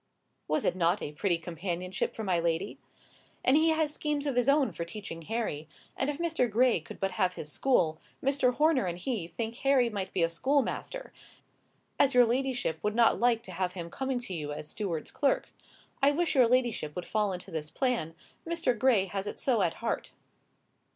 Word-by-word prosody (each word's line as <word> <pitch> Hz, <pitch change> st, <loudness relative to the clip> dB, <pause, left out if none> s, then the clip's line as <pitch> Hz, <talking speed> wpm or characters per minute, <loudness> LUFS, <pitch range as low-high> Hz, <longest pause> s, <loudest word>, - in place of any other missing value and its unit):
Was 155 Hz, -, 0 dB
it -, -, +2 dB
not 175 Hz, +2 st, +2 dB
a 145 Hz, -, -4 dB
pretty 170 Hz, +3 st, 0 dB
companionship 175 Hz, +2 st, -3 dB
for 220 Hz, -, -4 dB
my 185 Hz, -4 st, +1 dB
lady? 170 Hz, +4 st, -1 dB, 0.7 s
"And 260 Hz, -, +5 dB
he 320 Hz, +2 st, +5 dB
has 315 Hz, -2 st, +1 dB
schemes 295 Hz, -1 st, -2 dB
of 280 Hz, -3 st, -1 dB
his 245 Hz, +2 st, +3 dB
own 280 Hz, -1 st, +4 dB
for 170 Hz, -, -4 dB
teaching 170 Hz, -2 st, -7 dB
Harry; 165 Hz, -6 st, -3 dB, 0.3 s
and 270 Hz, -, -1 dB
if 290 Hz, -, -2 dB
Mr. 320 Hz, -7 st, 0 dB
Gray 235 Hz, -1 st, +3 dB
could 155 Hz, -, -11 dB
but 195 Hz, 0 st, 0 dB
have 180 Hz, -1 st, 0 dB
his 150 Hz, -, -5 dB
school, 160 Hz, -, +2 dB, 0.2 s
Mr. 270 Hz, -2 st, +2 dB
Horner 300 Hz, -, +3 dB
and 175 Hz, 0 st, -3 dB
he 195 Hz, -2 st, -3 dB
think 230 Hz, +5 st, -5 dB
Harry 260 Hz, -4 st, +3 dB
might 195 Hz, -3 st, -4 dB
be 170 Hz, -3 st, +2 dB
schoolmaster, 280 Hz, -, -1 dB, 0.9 s
as 275 Hz, -2 st, +4 dB
your 245 Hz, -1 st, +8 dB
ladyship 245 Hz, -6 st, -1 dB
would 210 Hz, 0 st, -1 dB
not 235 Hz, -1 st, +4 dB
like 235 Hz, -1 st, +3 dB
to 185 Hz, -, -10 dB
have 180 Hz, 0 st, -2 dB
him 170 Hz, -2 st, -6 dB
coming 265 Hz, -1 st, -2 dB
to 220 Hz, -6 st, -7 dB
you 150 Hz, -4 st, -4 dB
as 150 Hz, 0 st, -5 dB
steward's 170 Hz, -4 st, -3 dB
clerk. 280 Hz, -, +1 dB, 0.5 s
I 275 Hz, -, +6 dB
wish 315 Hz, +2 st, +1 dB
your 255 Hz, -5 st, +5 dB
ladyship 235 Hz, -11 st, +1 dB
would 180 Hz, -, -4 dB
fall 210 Hz, -2 st, 0 dB
into 185 Hz, +1 st, -7 dB
this 155 Hz, -2 st, -4 dB
plan; 230 Hz, -, -1 dB, 0.3 s
Mr. 335 Hz, -6 st, 0 dB
Gray 225 Hz, -4 st, +3 dB
has 195 Hz, +1 st, -4 dB
it -, -, -5 dB
so 240 Hz, -6 st, +2 dB
at 175 Hz, -3 st, +1 dB
heart." -, -, -2 dB
220 Hz, 195 wpm, -30 LUFS, 175-265 Hz, 0.9 s, your